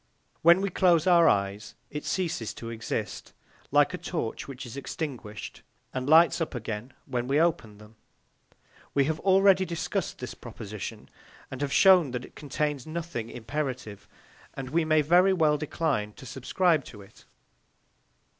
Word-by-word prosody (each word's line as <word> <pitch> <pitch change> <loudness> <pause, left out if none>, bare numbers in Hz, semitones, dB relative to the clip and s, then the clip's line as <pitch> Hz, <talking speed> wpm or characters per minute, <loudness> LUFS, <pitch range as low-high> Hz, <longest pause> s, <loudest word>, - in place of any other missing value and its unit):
When 170 +3 +6
we 200 -1 -1
close 175 -3 +3
our 170 -3 +6
eyes, 100 +1 -1 0.2
it 150 - -5
ceases 165 - -2
to 115 0 -7
exist, 115 -1 -5 0.4
like - - +3
a - - -4
torch - - -4
which 135 -1 -8
is 120 - -9
extinguished, 130 -7 -6 0.3
and 130 +1 -3
lights 165 +2 +6
up 160 - -2
again 115 +1 -5
when 125 -2 -3
we 140 +3 +2
open 160 -11 0
them. 105 +1 -16 1.0
We 140 -1 +4
have 160 +2 -1
already 190 0 +5
discussed 170 -2 -3
this - - -6
proposition, - - -8 0.4
and 130 +1 -6
have 145 -1 -1
shown 185 -5 +6
that 125 - -4
it - - -17
contains 145 -1 -3
nothing 155 -8 -5
imperative; 120 -4 -5 0.5
and 130 -1 -6
we 165 +1 +2
may 155 -1 +3
very 180 +5 +5
well 155 -4 +2
decline 145 -9 -1
to 130 - -13
subscribe 150 +5 +1
to 105 -3 -11
it. 100 - -19
145 Hz, 155 wpm, -27 LUFS, 120-170 Hz, 1.0 s, When